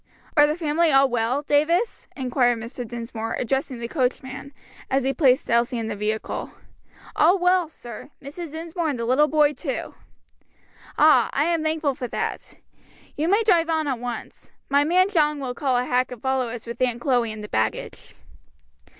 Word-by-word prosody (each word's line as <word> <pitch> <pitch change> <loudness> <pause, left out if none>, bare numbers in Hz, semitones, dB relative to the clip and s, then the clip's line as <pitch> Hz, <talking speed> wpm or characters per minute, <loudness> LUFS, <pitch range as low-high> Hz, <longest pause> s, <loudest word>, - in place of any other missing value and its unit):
"Are 295 -1 +6
the 300 - 0
family 325 0 +1
all 270 0 +5
well, 245 +3 0
Davis?" 330 +9 +1
inquired 250 -2 +1
Mr. 235 +1 -7
Dinsmore, 230 -1 -5
addressing 265 +1 -2
the 235 0 -5
coachman, 260 +1 -3 0.4
as 270 0 +1
he 270 +1 0
placed 260 -1 +3
Elsie 235 +1 +1
in 225 -1 -3
the 215 - -3
vehicle. 215 +1 -3 0.7
"All 350 +5 +5
well, 360 -2 +2
sir; 240 -5 -10
Mrs. 310 +4 -8
Dinsmore 325 +2 -3
and 280 - -2
the 230 - -3
little 260 +5 +4
boy 300 -1 +3
too." 280 -4 -5 1.0
"Ah, - - +5
I 285 - +2
am 335 0 +1
thankful 310 -2 0
for 250 -1 -5
that. - - -4 0.6
You 305 +3 -1
may 410 +5 +3
drive 340 -5 +3
on 315 -2 0
at 260 -4 -1
once. 245 0 -7 0.2
My 280 +1 +4
man 360 +5 +3
John 300 -6 +1
will 260 -3 -4
call 260 -1 0
a 245 - 0
hack 255 0 0
and 250 - -8
follow 260 -1 0
us 230 -1 -7
with 235 +1 -7
Aunt 245 -2 +1
Chloe 245 -3 +1
and 215 -1 -8
the - - -6
baggage." 110 0 -3
270 Hz, 180 wpm, -23 LUFS, 240-310 Hz, 1.0 s, Are